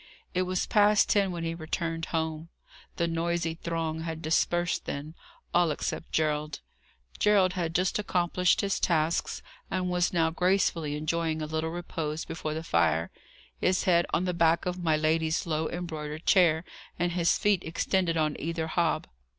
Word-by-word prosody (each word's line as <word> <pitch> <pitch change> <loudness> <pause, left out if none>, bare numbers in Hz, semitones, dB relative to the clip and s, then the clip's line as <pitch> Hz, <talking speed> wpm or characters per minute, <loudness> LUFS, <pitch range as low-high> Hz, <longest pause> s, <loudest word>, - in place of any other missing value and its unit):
It 180 - +1
was 185 0 0
past 210 -1 +4
ten 200 -2 +3
when 170 -1 -4
he 165 0 -2
returned 165 0 -3
home. 160 0 -3 0.5
The 170 - 0
noisy 170 0 -1
throng 165 -1 -3
had 160 -1 -5
dispersed 175 +2 +1
then, 145 +2 -5 0.4
all 175 -1 +4
except 150 +2 -3
Gerald. 150 -1 0 0.6
Gerald 200 -3 +4
had 170 -3 -2
just 180 +3 +1
accomplished 180 -2 +1
his 195 -1 0
tasks, 165 -1 0 0.3
and 180 -1 -1
was 180 0 +1
now 165 -2 +2
gracefully 170 -4 +1
enjoying 160 +1 -1
a 155 - -2
little 160 +1 -2
repose 160 -2 -4
before 155 -1 -4
the 160 - -4
fire; 85 - +1 0.5
his 185 0 +2
head 175 -3 +3
on 180 - +1
the 180 - 0
back 170 -1 +3
of 180 0 -3
my 160 -2 +3
lady's 160 +1 +1
low 160 -1 -1
embroidered 155 -3 -5
chair, 170 -4 +4 0.3
and 175 0 0
his 170 -1 +2
feet 205 -3 +2
extended 170 +1 0
on 155 -2 +1
either 165 +1 -2
hob. 165 +1 0
165 Hz, 160 wpm, -28 LUFS, 160-180 Hz, 0.6 s, past